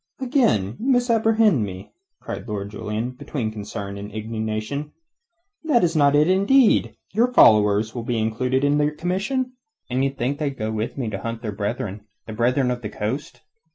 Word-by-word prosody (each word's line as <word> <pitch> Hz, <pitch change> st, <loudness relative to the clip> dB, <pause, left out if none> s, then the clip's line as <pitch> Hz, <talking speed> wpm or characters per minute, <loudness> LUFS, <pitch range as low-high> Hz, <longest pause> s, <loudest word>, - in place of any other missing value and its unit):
"Again 235 Hz, -, +1 dB
you 245 Hz, -, -4 dB
misapprehend 225 Hz, -, +3 dB
me," 95 Hz, -1 st, -7 dB, 0.3 s
cried -, -, -7 dB
Lord 100 Hz, -2 st, -4 dB
Julian, 105 Hz, +3 st, -3 dB
between 125 Hz, -2 st, -4 dB
concern 100 Hz, -1 st, -6 dB
and 105 Hz, +1 st, -8 dB
indignation. 110 Hz, +6 st, -4 dB, 0.7 s
"That 295 Hz, -, +3 dB
is 170 Hz, -1 st, +1 dB
not 145 Hz, -2 st, +4 dB
intended. 195 Hz, -, +4 dB, 0.2 s
Your 235 Hz, +4 st, +2 dB
followers 105 Hz, -, +5 dB
will 120 Hz, -, -4 dB
be 115 Hz, 0 st, -2 dB
included 125 Hz, +4 st, 0 dB
in 145 Hz, +1 st, +3 dB
your 150 Hz, 0 st, +1 dB
commission." 210 Hz, -, -2 dB, 0.4 s
"And 130 Hz, +1 st, +1 dB
d' -, -, +2 dB
ye -, -, +2 dB
think 135 Hz, +1 st, -3 dB
they'll 145 Hz, -3 st, -2 dB
go 110 Hz, -2 st, -3 dB
with 110 Hz, +4 st, -3 dB
me 120 Hz, -5 st, -2 dB
to 100 Hz, -, -4 dB
hunt 115 Hz, +1 st, -5 dB
their 110 Hz, -, -2 dB
brethren 105 Hz, 0 st, -4 dB, 0.2 s
the 110 Hz, -, -7 dB
Brethren 125 Hz, +3 st, +1 dB
of 125 Hz, 0 st, -3 dB
the 105 Hz, -, -5 dB
Coast? 130 Hz, +10 st, -4 dB
125 Hz, 175 wpm, -23 LUFS, 110-160 Hz, 0.7 s, followers